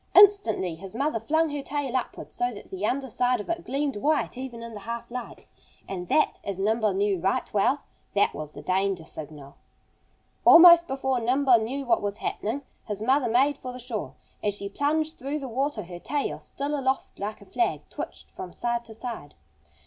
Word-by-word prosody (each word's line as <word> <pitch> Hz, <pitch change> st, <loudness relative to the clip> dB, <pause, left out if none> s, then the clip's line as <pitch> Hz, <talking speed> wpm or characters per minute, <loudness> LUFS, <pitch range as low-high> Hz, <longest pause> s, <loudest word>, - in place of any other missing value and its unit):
Instantly 380 Hz, -, +6 dB
his 190 Hz, +5 st, -10 dB
mother 275 Hz, -1 st, 0 dB
flung 315 Hz, +7 st, +1 dB
her 290 Hz, -1 st, -3 dB
tail 275 Hz, -2 st, -3 dB
upward, 255 Hz, -, -3 dB
so 245 Hz, 0 st, 0 dB
that 205 Hz, -, -11 dB
the 190 Hz, +1 st, -5 dB
under 270 Hz, +2 st, -1 dB
side 245 Hz, +1 st, +1 dB
of 210 Hz, -, -6 dB
it 340 Hz, 0 st, -3 dB
gleamed 275 Hz, -1 st, -1 dB
white 295 Hz, +6 st, +1 dB
even 245 Hz, -2 st, -6 dB
in 230 Hz, 0 st, -8 dB
the 210 Hz, -, -7 dB
half 235 Hz, +3 st, -6 dB
light. 250 Hz, -1 st, -7 dB, 0.4 s
And 180 Hz, -2 st, -5 dB
that 310 Hz, -, +2 dB
as 200 Hz, -2 st, -4 dB
Nimble 215 Hz, +1 st, +2 dB
knew 195 Hz, -1 st, +1 dB
right 190 Hz, +3 st, 0 dB
well 255 Hz, +8 st, +2 dB, 0.3 s
that 200 Hz, -, +3 dB
was 150 Hz, -1 st, -6 dB
the 145 Hz, -, -9 dB
danger 185 Hz, -1 st, 0 dB
signal. 150 Hz, -3 st, -9 dB, 0.9 s
Almost 340 Hz, 0 st, +9 dB
before 265 Hz, -2 st, 0 dB
Nimble 250 Hz, +1 st, +4 dB
knew 265 Hz, +5 st, -3 dB
what 235 Hz, -2 st, +3 dB
was 205 Hz, 0 st, -2 dB
happening 235 Hz, +8 st, -3 dB, 0.2 s
his 210 Hz, -1 st, -3 dB
mother 260 Hz, +1 st, +3 dB
made 270 Hz, +5 st, +3 dB
for 255 Hz, -, -6 dB
the 250 Hz, -, -8 dB
shore. 240 Hz, -4 st, -4 dB, 0.3 s
As 205 Hz, -1 st, 0 dB
she 200 Hz, -1 st, -5 dB
plunged 310 Hz, +7 st, 0 dB
through 275 Hz, +4 st, -2 dB
the 275 Hz, -3 st, -5 dB
water 260 Hz, -1 st, -1 dB
her 175 Hz, 0 st, -9 dB
tail, 285 Hz, +8 st, -2 dB
still 285 Hz, +1 st, -4 dB
aloft 265 Hz, -1 st, -1 dB
like 210 Hz, +2 st, -4 dB
a 200 Hz, -, -14 dB
flag, 355 Hz, -, 0 dB
twitched -, -, -7 dB
from 180 Hz, -, -8 dB
side 235 Hz, 0 st, -1 dB
to 220 Hz, -, -9 dB
side. 225 Hz, -11 st, -7 dB
240 Hz, 195 wpm, -26 LUFS, 200-275 Hz, 0.9 s, Almost